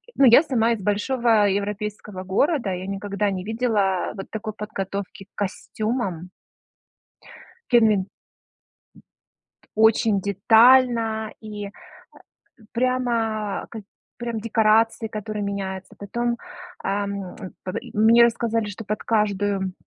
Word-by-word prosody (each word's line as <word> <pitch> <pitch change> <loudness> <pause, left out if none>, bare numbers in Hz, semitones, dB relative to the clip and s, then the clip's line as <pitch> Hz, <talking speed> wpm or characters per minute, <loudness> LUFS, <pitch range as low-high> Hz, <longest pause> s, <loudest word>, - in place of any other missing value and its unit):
ну, 275 - +5
я 250 +5 +8
сама 235 -6 +1
из 210 - -5
большого 215 +1 +2
европейского 205 -1 -3
города, 215 - +1
я 180 +1 -5
никогда 200 +1 -2
не 185 -1 -4
видела 210 -4 0
вот 195 - -8
такой 215 -1 -5
подготовки 200 -2 -5
к 195 - -55
костюмам. 200 -2 -3 1.4
Кевин. 215 -5 +4 1.7
Очень 220 -1 +4
детально 225 +2 +4
и, 210 -2 -7
э, - - -9 1.0
прямо 235 -4 -1
прям 220 -2 -7
к - - -27 0.3
прям 235 -2 -4
декорации 225 +1 +2
которые 215 -1 -5
меняются, 195 -1 -5
потом, 235 +4 -2 0.5
ам, 200 -1 -3 0.3
м, 185 - -3
и - - -11
мне 230 +2 +6
рассказали 230 -1 +1
что 210 +2 -8
под 210 +1 -3
каждую 205 -3 0
215 Hz, 110 wpm, -23 LUFS, 200-230 Hz, 1.7 s, я